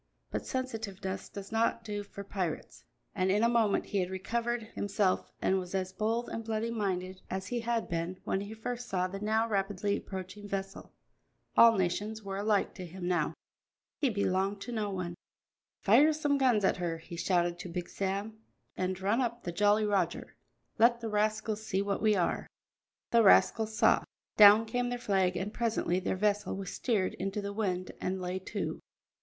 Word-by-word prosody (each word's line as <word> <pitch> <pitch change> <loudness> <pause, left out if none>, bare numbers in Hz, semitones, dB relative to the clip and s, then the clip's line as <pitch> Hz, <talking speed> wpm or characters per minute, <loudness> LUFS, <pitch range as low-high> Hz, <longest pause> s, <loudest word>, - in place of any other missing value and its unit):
But - - -3
sensitiveness 215 -7 -4
does 200 0 -8
not 230 +1 +1
do 205 -2 -3
for 200 0 -9
pirates, 185 -5 -4 0.3
and 185 -2 +1
in 205 +3 +3
a - - +6
moment 230 -4 +2
he 200 - -1
had 180 -1 0
recovered 235 +5 -2
himself 205 -2 0
and 190 - +3
was 180 +1 -6
as 190 0 -2
bold 225 +4 -1
and 225 - -4
bloody 225 +1 -2
minded 185 -4 -2
as 190 0 -3
he 245 - -1
had 235 0 -1
been 170 +2 -3
when 190 - -1
he 205 +2 -7
first 245 +2 -5
saw 185 -1 +1
the 195 +2 -6
now 220 +2 +1
rapidly 200 -1 0
approaching 190 +2 -7
vessel. 195 0 -5 0.6
All 230 -2 +8
nations 205 +4 -1
were 195 -1 -4
alike 205 0 +1
to 185 - -7
him 175 +1 -6
now, 180 -1 +2
and - - -7 0.6
he 280 - +2
belonged 200 -1 0
to 245 - -6
none. 195 -6 -2 0.7
"Fire 275 +10 +6
some 290 -2 +1
guns 240 -7 +3
at - - +2
her," 170 -2 -2
he 165 +1 -10
shouted 175 0 +1
to 180 - -6
Big 175 0 -4
Sam, 200 +3 -3 0.4
"and 185 0 -2
run 205 +6 +1
up 235 -1 -2
the 175 - -3
Jolly 205 +4 +3
Roger; 205 -2 -1 0.4
let 235 +1 +5
the 225 - -3
rascals 215 0 0
see 195 -2 0
what 200 0 -2
we 215 -1 +4
are." 180 -3 0 0.6
The 235 - +6
rascals 220 +1 +4
saw. - - +5 0.3
Down 210 +1 +9
came 245 +2 -1
their 245 - -2
flag, 190 -6 +1
and 195 +4 -3
presently 220 -6 0
their 190 - -1
vessel 205 0 +1
was 195 -2 -5
steered 210 -7 0
into 195 +2 -3
the 200 0 -4
wind 185 -4 -2
and 185 +1 -1
lay 180 +1 -3
to. 190 - -4
200 Hz, 185 wpm, -31 LUFS, 190-225 Hz, 0.7 s, Down